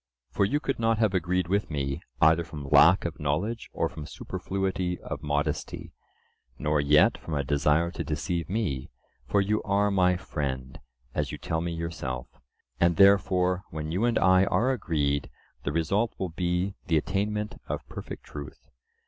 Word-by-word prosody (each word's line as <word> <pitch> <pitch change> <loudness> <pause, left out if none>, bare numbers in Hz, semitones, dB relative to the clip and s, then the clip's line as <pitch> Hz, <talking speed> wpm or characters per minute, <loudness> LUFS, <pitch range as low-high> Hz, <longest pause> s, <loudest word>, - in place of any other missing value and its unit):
For 100 - +2
you 145 +9 +1
could 135 -4 -2
not 115 -1 +2
have 110 -3 +2
agreed 90 -1 0
with 100 +3 0
me, 70 -3 -2 0.2
either 80 +2 +5
from 75 -4 -8
lack 90 +7 +6
of 85 0 -4
knowledge 90 +11 -2
or - - 0
from 75 -2 -8
superfluity 95 -2 -3
of - - -6
modesty, 75 -1 -2 0.6
nor 75 -1 +1
yet 75 +2 +4
from 80 - -5
a 70 - 0
desire 75 +4 +2
to 85 - -4
deceive 80 +3 -2
me, 95 - -2 0.4
for 100 - +3
you 105 +2 +1
are 100 0 +1
my 90 -2 +3
friend, 65 -7 -4 0.3
as - - -1
you - - -5
tell 80 0 -2
me 85 0 -2
yourself. 75 -7 -4 0.5
And 85 0 +4
therefore 95 -1 +4
when 80 0 -5
you 95 +7 +1
and 120 -1 +2
I 95 +2 +5
are 125 +6 +2
agreed, 75 - 0 0.4
the 70 - 0
result 100 +8 0
will 95 - -2
be 90 +3 -1
the 80 - +3
attainment 105 +5 -2
of - - -4
perfect - - -8
truth. 75 0 -10
85 Hz, 165 wpm, -27 LUFS, 75-100 Hz, 0.6 s, lack